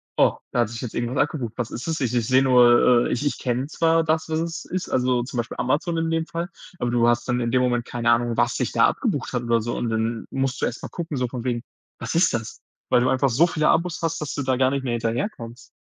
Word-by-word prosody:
„Oh, - - +3
da 120 - -1
hat 115 - 0
sich 115 0 -7
jetzt 125 - -6
irgendwas 120 +3 -2
abgebucht. 130 -7 -5
Was 120 -2 -3
ist 125 +7 -6
das? 160 -1 -1
Ich 125 -3 -1
ich 120 - +1
sehe 130 0 +4
nur 120 -1 +5
äh, - - -3
ich 130 +4 -1
ich 145 - 0
kenne 125 +2 -2
zwar 165 +1 +2
das, 160 0 0
was 160 0 0
es 165 0 -4
ist, 185 0 -4
also, 125 -1 +1
zum 125 0 -7
Beispiel 120 0 -3
Amazon 155 +6 0
in 165 0 0
dem 165 0 0
Fall.“ 170 +2 -4 0.3
Aber 120 - -1
du 120 -1 +3
hast 120 +1 +1
dann 125 0 0
in 115 -1 -1
dem 130 - +3
Moment 120 -1 +1
keine 120 -1 0
Ahnung, 120 0 +1
was 120 0 +2
sich - - -1
da - - +4
abgebucht - - -2
hat 125 -1 -1
oder 115 -1 +1
so, 120 +2 -3
und 120 - -2
dann 115 +1 -2
musst 135 0 -2
du - - +2
erst 120 - -4
mal - - -5
gucken 165 -5 -5
so 125 -1 0
von 120 -1 -6
wegen: 120 -1 -2 0.4
„Was - - -4
ist 170 +1 +3
das?“ 115 -2 -5 0.3
Weil 120 - +4
du 130 - +2
einfach 130 +1 +2
so 140 +9 +4
viele 155 -2 0
Abos 175 0 +1
hast, 165 -1 -2
dass 150 - -4
du 145 - -3
da 130 0 +1
gar 130 +1 +2
nicht 140 -1 -2
mehr 125 -3 -2
hinterherkommst. 115 - -4
125 Hz, 275 wpm, -23 LUFS, 120-155 Hz, 0.4 s, nur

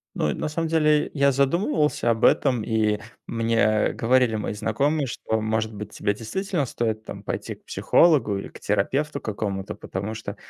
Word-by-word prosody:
Ну 75 - 0
и, - - -2
на - - -3
самом 165 +2 -2
деле, 150 -2 +3
я 140 -1 +4
задумывался 150 - +1
об 115 0 +1
этом, 125 -6 +3
и 110 -2 +1 0.3
мне, 115 0 0
э, 110 -1 +3
говорили 125 -1 +2
мои 105 -1 -2
знакомые, 135 +8 0
что, 110 -2 -2
может 110 0 -1
быть, 105 0 -8
тебе 100 -1 -1
действительно 150 - -2
стоит, 110 -2 -2
там, - - -8
пойти - - -4
к - - -26
психологу 145 - +3
или 100 - -5
к - - -13
терапевту 140 +9 -1
какому-то. 100 -2 -4
Потому 100 +4 -5
что, 110 - -6
115 Hz, 175 wpm, -24 LUFS, 110-145 Hz, 0.3 s, я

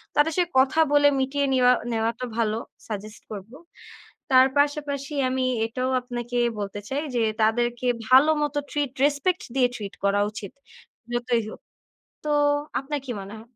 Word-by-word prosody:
তাদের 305 +2 +3
সাথে 350 -1 +2
কথা 270 +4 +3
বলে 290 0 +6
মিটিয়ে 280 +2 0
নিওয়া 250 -1 +5 0.2
নেওয়াটা 230 +2 -1
ভালো, 220 -1 +1 0.3
সাজেস্ট 215 0 -7
করব। 205 +2 -8 0.8
তার 260 +1 +8
পাশাপাশি 285 0 -1 0.2
আমি 260 0 0 0.2
এটাও 255 +3 -2
আপনাকে 245 -1 -5 0.2
বলতে 205 0 -4
চাই 285 +3 -1
যে, 235 - +2 0.2
তাদেরকে 240 +2 +1 0.2
ভালো 270 +5 +7
মতো 290 0 -1
ট্রিট 290 -3 -1
রেসপেক্ট 295 +5 0
দিয়ে 250 -2 +4
ট্রিট 200 -2 -7
করা 200 +1 +3
উচিত। 210 -2 -8 0.6
যতই 240 -1 0
হোক। - - -11 0.6
তো - - -1 0.5
আপনার 285 +2 -4
কি 250 - -4
মনে 200 +3 -9
হয়? 225 - -15
255 Hz, 150 wpm, -25 LUFS, 225-285 Hz, 0.8 s, তার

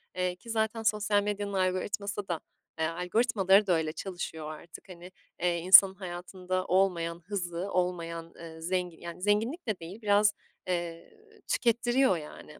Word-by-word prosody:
eee, 180 -1 -1
ki 230 +6 -15
zaten 225 0 -1
sosyal 210 -1 +2
medyanın 205 -1 -3
algoritması 195 +2 -1
da, 170 -3 -2 0.4
eee, 160 - +2
algoritmaları 195 +3 +2
da 180 - +4
öyle 160 -2 0
çalışıyor 160 -3 -5
artık, 170 +4 -13
hani, 180 0 -11 0.3
eee, 175 -1 +2
insanın 190 +2 +8
hayatında 185 0 -4
olmayan 175 -3 +1
hızı, 180 -1 -3
olmayan, 170 -2 -2
eee, 160 -1 -10
zengi 180 0 -2
yani, 170 +1 -8
zenginlik 225 - 0
de 215 -4 -1
değil 175 +7 -9
biraz, 210 0 +4 0.3
eee, 170 - -3 0.3
tükettiriyor 240 -2 +2
yani. 150 -1 -11
185 Hz, 145 wpm, -29 LUFS, 170-205 Hz, 0.4 s, insanın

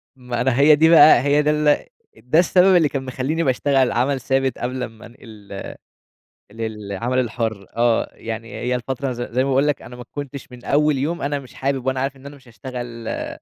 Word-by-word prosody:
ما 125 -2 -4
أنا 125 0 +1
هي 150 +2 +7
دي 160 +2 +4
بقى 155 -5 +8
هي 145 +2 +3
ده 150 0 +2
ال 150 -1 +2 0.3
ده 125 +9 +1
السبب 185 +1 +4
اللي 160 -5 +4
كان 135 -2 -3
مخلّيني 135 +6 -2
باشتغل 135 -1 +2
عمل 130 +3 0
ثابت 135 -1 0
قبل 125 +1 -3
أمّا 110 -1 -9
أنقل 105 -4 -11 0.9
للعمل 110 +2 -4
الحُرّ، 110 -4 -2
آه، 120 -1 +2
يعني 115 0 -7
هي 125 +1 -2
الفترة 130 +2 -3
ز 120 0 -5
زي 125 +2 -1
ما - - -2
باقول 135 +2 +3
لك، 150 - -1
أنا 125 +2 -11
ما 125 - -9
كنتش 140 -2 -7
من 125 -1 -12
أول 150 0 +2
يوم 160 +6 -2
أنا 145 +1 -1
مش 130 -2 -13
حابب 135 -1 -2
وأنا 130 0 0
عارف 135 +1 -2
إن 135 +1 -14
أنا 145 +1 -10
مش 130 -3 -20
هاشتغل 120 -1 -7
آآ، - - -4
130 Hz, 205 wpm, -21 LUFS, 120-145 Hz, 0.9 s, بقى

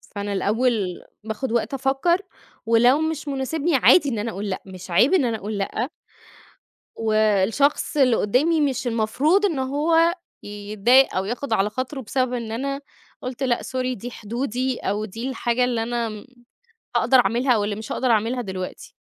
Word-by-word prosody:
فأنا 205 0 -3
الأول 210 -2 0 0.2
باخد 220 +3 -4
وقت 235 +3 0
أفكر، 270 +7 +1 0.4
ولو 240 +5 +4
مش 315 -1 -2
مناسبني 285 +4 -1
عادي 285 +3 +5
إن 230 -5 -2
أنا 225 +2 -3
أقول 200 +2 -5
لأ، 185 - -3
مش 185 -1 -10
عيب 250 - +4
إن 340 -8 +4
أنا 230 -2 -1
أقول 210 +1 -5
لأ. 220 +6 -2 1.1
والشخص 220 +7 +1
اللي 255 -5 +4
قدامي 300 +10 +2
مش 270 -3 0
المفروض 255 - +2
إن 330 -8 -2
هو 320 +6 +2 0.3
يتضايق 210 +5 +2
أو 190 - 0
ياخد 245 +4 -4
على 210 -1 +2
خاطره 260 +5 -4
بسبب 255 +1 -1
إن 235 -3 -4
أنا 275 +4 -3 0.4
قلت: 255 +1 -5
"لأ، 250 -2 +1
sorry 255 -1 -3
دي 240 +5 -7
حدودي 245 +3 -3
أو 205 +2 -2
دي 225 +5 -5
الحاجة 250 -2 0
اللي 240 -2 0
أنا 230 -2 -3 0.7
هاقدر 260 - +4
أعملها 240 +3 +2
واللي 205 0 -1
مش 215 +1 -8
هاقدر 260 - -1
أعملها 230 +3 +1
دلوقتي." 185 -3 -6
240 Hz, 160 wpm, -23 LUFS, 215-270 Hz, 1.1 s, عادي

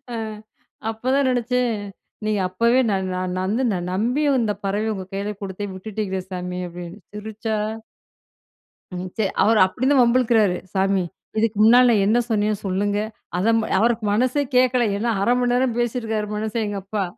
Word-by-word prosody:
அ - - -3 0.7
அப்பதான் 260 +4 +1
நெனைச்சேன். 245 -1 0 0.5
நீங்க 215 -2 +1
அப்பவே 235 +7 +3
நான், 190 -1 -1
நான் 185 0 -2
வந்து 210 +8 0 0.3
நம்பி 245 +10 0
வந்து 220 -4 +1
பறவைய 210 +3 0
உங்க 190 -1 -6
கையில 200 +2 -3
குடுத்தேன் 195 0 -5
விட்டுட்டீங்களே 190 -1 -4
சாமி! 180 0 -4
அப்பிடின்னு 175 +3 -9
சிரிச்சா 220 +1 -4 1.4
ம். 180 +1 -4
சரி, 205 -3 +1
அவரு 220 +1 +4
அப்பிடி 190 +7 -2
இருந்தும் 275 -1 +4
வம்புளுக்குறாரு. 235 -6 +3 0.2
சாமி! 195 -1 +2 0.3
இதுக்கு 220 -1 +1
முன்னால 245 +3 +7
நான் 210 -4 +3
என்ன 225 +3 +3
சொன்னேன்? 210 -1 +1
சொல்லுங்க. 200 +2 0 0.4
அதம் 225 +4 +3 0.2
அவருக்கு 230 +1 +2
மனசே 255 +6 +2
கேட்கல. 250 -2 +3
ஏனா, 230 +3 0
1/2 220 - +2
மணி 245 0 +1
நேரம் 250 -2 +1
பேசியிருக்கிறாரு 225 -3 -1
மனுஷேன். 220 +1 -2
எங்க 205 -1 -3
அப்பா 205 0 -2
215 Hz, 150 wpm, -22 LUFS, 195-240 Hz, 1.4 s, முன்னால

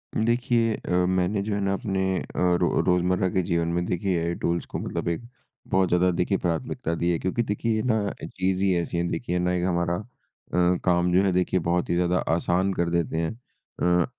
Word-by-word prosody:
देखिए 115 0 +2
अ, - - -7 0.2
मैंने 95 +2 +1
जो 105 0 -2
है 100 - -1
ना 100 0 +1
अपने 95 -3 -2 0.2
अ, - - -5 0.4
रो - - +2
रोज़मर्रा 90 +1 +2
के 95 - +1
जीवन 85 -1 0
में 85 +1 0
देखिए 90 0 0
एआई 85 +1 -1
टूल्स 85 0 0
को - - -5
मतलब - - -4
एक 85 - -2 0.5
बहुत 95 -1 +2
ज़्यादा 90 +1 +3
देखिए 90 +3 0
प्राथमिकता 85 -1 -2
दी 85 +1 0
है। 85 - 0
क्योंकि 95 +6 -1
देखिए 110 +1 -1
ये 110 - -1
ना 110 -5 +1
चीज़ 95 0 -1
ही 95 -2 +3
ऐसी 85 0 -2
है, 85 - 0
देखिए 90 -8 -2
ना 90 0 +1
एक 90 -1 0
हमारा 85 -1 0
अ, 90 -4 -2
काम 90 -1 +3
जो 95 - +5
है 95 - +2
देखिए 90 0 +1
बहुत 85 +1 0
ही 85 - +1
ज़्यादा 90 0 +2 0.2
आसान 90 +3 +1
कर 85 -2 0
देते 85 -1 0
हैं। 80 0 0
अ, 90 -6 -2
90 Hz, 210 wpm, -25 LUFS, 85-100 Hz, 0.5 s, जो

